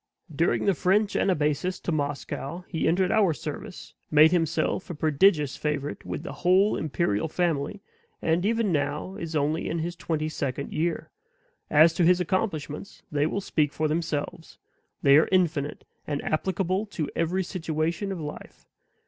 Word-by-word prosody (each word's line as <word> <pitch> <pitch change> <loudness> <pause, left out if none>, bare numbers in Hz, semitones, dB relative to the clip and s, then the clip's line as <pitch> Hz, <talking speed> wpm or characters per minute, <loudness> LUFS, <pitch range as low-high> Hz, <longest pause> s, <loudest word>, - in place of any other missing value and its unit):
During 165 +4 +1
the 200 - +4
French 195 +5 +1
anabasis 155 0 +1
to - - -2
Moscow 145 +2 -3
he 165 - -1
entered 180 +3 +2
our 205 -7 +4
service, - - -7 0.2
made 155 +1 +6
himself 170 +2 0
a 175 - -4
prodigious 150 -1 +3
favorite 150 -1 -3
with - - -5
the - - -6
whole 185 +4 +4
imperial 155 - -1
family, 170 +2 -1 0.4
and 165 +2 +1
even 225 -1 +1
now 145 +4 -1
is 165 -3 -5
only 150 +2 0
in 165 - -2
his 170 +2 -3
twenty 155 -3 -2
second 140 -3 -3
year. 165 +1 -2 0.6
As 155 +2 +6
to 175 - +1
his 180 +2 +5
accomplishments, 180 -3 -3
they 145 0 +1
will 200 - -2
speak 150 -6 0
for 155 - 0
themselves; 160 0 -3 0.5
they 140 +1 +7
are 155 - +4
infinite, 165 -6 0 0.2
and 145 -1 -2
applicable 190 +5 -1
to 165 -7 -3
every 175 +3 0
situation 170 +2 -2
of 190 - -4
life. 150 -1 -8
165 Hz, 155 wpm, -26 LUFS, 150-185 Hz, 0.6 s, they